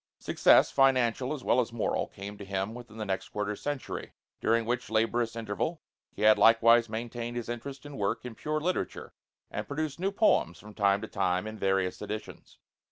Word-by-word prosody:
Success, - - +4
financial 130 -1 +3
as 145 -4 -4
well 125 - +3
as 120 -1 0
moral, 115 -1 -1
came 100 +1 -8
to 100 - -9
him 95 +2 -3
within 120 -2 -11
the 110 - -3
next 95 -1 -3
quarter 105 0 -2
century, 145 +4 -5 0.3
during 115 0 +2
which 125 +2 -2
laborious 115 +1 +1
interval 115 +9 -3 0.3
he - - -6
had 110 0 +6
likewise 115 0 +6
maintained 120 +1 -4
his 120 - -4
interest 135 +4 -6
and 145 -1 -8
work 110 +4 -1
in 125 - -6
pure 155 +6 -2
literature 180 +4 -3 0.4
and - - -4
produced 150 +1 -3
new 195 +2 0
poems 200 - +2
from 105 0 -13
time 100 -1 +2
to 110 - -5
time 95 -1 0
in 110 0 -6
various 95 -3 0
editions. 110 0 -7
115 Hz, 185 wpm, -29 LUFS, 105-125 Hz, 0.4 s, had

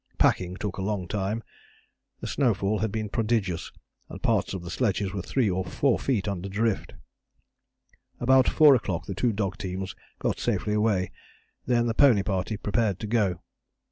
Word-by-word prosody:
Packing 90 0 +2
took 100 -3 -4
a - - -3
long 95 -2 -2
time. 105 +4 -2 0.8
The - - -5
snowfall 105 -6 +1
had 110 -2 -1
been 110 0 -2
prodigious, 105 -6 -1 0.4
and - - -8
parts - - +1
of 90 - -6
the 85 - -7
sledges 100 -2 0
were 100 - -2
3 120 +6 0
or 95 +1 -1
4 120 +8 +1
feet 110 -7 0
under 100 -1 -3
drift. 110 +1 -1 1.2
About 130 +1 +5
4 150 -2 +7
o'clock 100 -9 -1
the 100 - -4
two 115 +6 +1
dog 100 -2 -2
teams 95 -1 -4 0.2
got - - -1
safely 105 - 0
away. 105 -4 +1 0.6
Then 120 -1 +3
the 115 - 0
pony 115 -6 +5
party 95 +2 -2
prepared 105 -2 0
to - - -3
go. 100 -5 +1
105 Hz, 170 wpm, -27 LUFS, 95-115 Hz, 1.2 s, 4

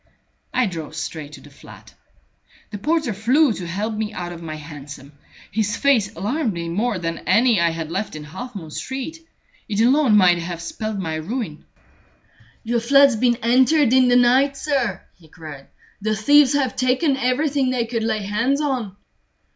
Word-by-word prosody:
I 255 - +2
drove 165 -5 -6
straight 155 -2 -6
to - - -11
the 145 - -16
flat. 140 - -15 0.8
The 205 - -6
porter 305 -1 0
flew 245 +7 +3
to 180 -4 -6
help 205 +6 -3
me 215 0 -3
out 175 -1 -6
of 170 - -10
my 155 -2 -6
hansom. 145 -2 -10 0.4
His 210 +1 -1
face 250 -8 +2
alarmed 225 - -1
me 170 -1 -5
more 210 +5 -1
than 165 -1 -4
any 220 +1 +4
I 170 - +3
had 165 -1 -5
left 195 -1 -3
in 155 - -7
Half 215 - -9
moon 160 -5 -8
Street. 265 - -5 0.5
It 210 -1 -1
alone 250 -1 +4
might 180 -3 +5
have 170 0 -5
spelled 215 +5 -5
my 165 -5 -3
ruin. 175 -1 -5 1.0
"Your 235 +1 0
flat's 275 +2 +5
been 240 +2 +2
entered 255 +3 +4
in 260 -1 +5
the 245 - +4
night, 260 +3 +4
sir," 265 - -1
he 165 - -21
cried. 155 -4 -11 0.3
"The 215 +1 0
thieves 285 +5 +5
have 270 -4 0
taken 260 +3 +1
everything 265 +1 0
they 250 -2 0
could 230 0 -3
lay 220 -2 -1
hands 230 +8 0
on." 255 -10 -2
220 Hz, 175 wpm, -21 LUFS, 170-255 Hz, 1.0 s, might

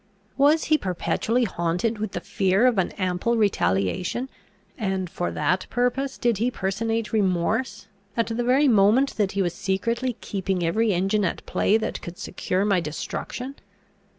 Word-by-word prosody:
Was 290 +4 +4
he 310 -1 +3
perpetually 220 +6 0
haunted 180 +3 -1
with 215 -2 -3
the - - -3
fear 195 +4 +2
of 245 -6 +3
an 185 - +1
ample 185 +5 0
retaliation, 180 - 0 0.5
and 190 -4 -2
for 175 +1 -3
that 185 +1 0
purpose 250 +3 0
did 235 -5 +1
he 235 +3 +2
personate 225 +2 -2
remorse, 210 +3 0 0.3
at 230 - +3
the 230 +1 -2
very 265 +4 +4
moment 225 +4 +4
that 205 -3 +1
he 200 0 +1
was 175 -2 -1
secretly 230 +6 -1
keeping 190 -2 -2
every 215 +7 +2
engine 195 +3 +1
at 180 - -2
play 215 - +2
that 220 - -3
could 175 +1 -8
secure 185 +1 -2
my 195 -3 +3
destruction?" 210 - -5
210 Hz, 155 wpm, -24 LUFS, 185-235 Hz, 0.5 s, Was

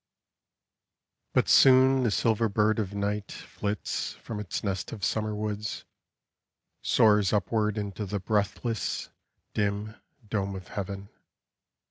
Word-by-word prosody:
But - - +2
soon 130 0 +6
the 120 - +2
silver 110 +2 +2
bird 110 +2 +2
of 100 -2 -3
night 100 0 -2
Flits 100 0 -4
from 110 -3 -7
its 105 -4 -4
nest 95 -3 -2
of 100 -4 -3
summer 110 -1 -1
woods; 105 0 -4 1.0
Soars 105 -3 +4
upward 105 +1 +1
Into 105 0 -4
the 100 +2 -2
breathless, 105 +3 -1 0.4
dim, 105 +1 -1 0.3
dome 100 -2 -2
of 95 -2 -9
heaven. 100 0 -5
105 Hz, 115 wpm, -28 LUFS, 100-110 Hz, 1.0 s, soon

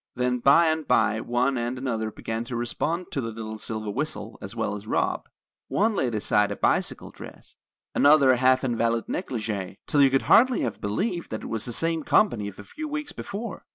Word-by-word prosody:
Then 125 0 0
by 140 +7 +6
and 160 -1 0
by 110 0 +3
one 125 +2 0
and 120 +2 -2
another 115 -4 -2
began 110 +2 -4
to 120 - -5
respond 155 +9 -2
to 135 - -2
the 115 - -4
little 110 -1 -7
silver 110 -1 -4
whistle, 110 -4 -4
as 100 +4 -8
well 110 -2 -1
as 105 +1 -7
Rob. - - -1 0.4
One 215 +1 +1
laid 120 - 0
aside 105 0 +2
a - - -2
bicycle - - 0
dress, - - -12 0.4
another 145 -2 +6
a 125 - +3
half 130 +1 +3
invalid 115 -2 0
negligee, 110 - -3
till 145 - +2
you 135 - +7
could 135 0 +1
hardly 250 +1 +5
have 115 - -3
believed 175 - -2
it 110 - -5
was 115 -2 -3
the 120 - -5
same 165 +6 0
company 120 - +2
of 100 - -9
a 105 - -9
few 305 - -7
weeks 295 0 -4
before. 210 +1 -6
120 Hz, 200 wpm, -25 LUFS, 110-155 Hz, 0.4 s, you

